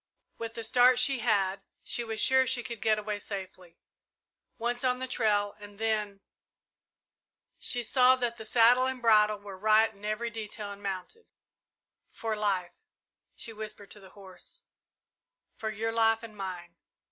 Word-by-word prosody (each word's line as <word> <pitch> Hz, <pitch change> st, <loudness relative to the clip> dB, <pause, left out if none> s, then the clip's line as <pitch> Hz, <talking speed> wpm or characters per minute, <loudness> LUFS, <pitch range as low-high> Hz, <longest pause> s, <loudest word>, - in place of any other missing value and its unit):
With 230 Hz, -1 st, -6 dB
the 230 Hz, -, -5 dB
start 245 Hz, +2 st, +5 dB
she 260 Hz, +1 st, +5 dB
had, 200 Hz, -4 st, +1 dB, 0.2 s
she 240 Hz, -, -2 dB
was 220 Hz, -1 st, -4 dB
sure 260 Hz, +2 st, +4 dB
she 250 Hz, -2 st, 0 dB
could 235 Hz, -3 st, -7 dB
get 215 Hz, -1 st, +3 dB
away 210 Hz, -1 st, -3 dB
safely. 190 Hz, -4 st, -8 dB, 0.8 s
Once 240 Hz, +2 st, -2 dB
on 250 Hz, -1 st, +2 dB
the 260 Hz, -, -4 dB
trail, 205 Hz, -4 st, +1 dB
and 205 Hz, -1 st, -12 dB
then 210 Hz, -2 st, -2 dB, 1.4 s
She 245 Hz, -1 st, 0 dB
saw 255 Hz, +2 st, +5 dB
that 235 Hz, -3 st, -3 dB
saddle 245 Hz, +3 st, +5 dB
and 260 Hz, -1 st, -3 dB
bridle 215 Hz, -3 st, +4 dB
were 200 Hz, -2 st, -10 dB
right 220 Hz, +2 st, +4 dB
in 200 Hz, 0 st, -21 dB
every 215 Hz, +3 st, -2 dB
detail, 215 Hz, -2 st, -6 dB
and 200 Hz, 0 st, -10 dB
mounted. 200 Hz, -, -6 dB, 0.8 s
"For 225 Hz, -1 st, -4 dB
life," 195 Hz, -4 st, -1 dB, 0.6 s
she 225 Hz, -, -5 dB
whispered 215 Hz, -2 st, -8 dB
to 210 Hz, -, -8 dB
the 190 Hz, -1 st, -15 dB
horse; 190 Hz, -2 st, -11 dB, 0.9 s
"for 220 Hz, -, -4 dB
your 220 Hz, +1 st, -2 dB
life 225 Hz, 0 st, +2 dB
and 220 Hz, -2 st, -10 dB
mine!" 180 Hz, -3 st, -7 dB
220 Hz, 155 wpm, -29 LUFS, 205-235 Hz, 1.4 s, start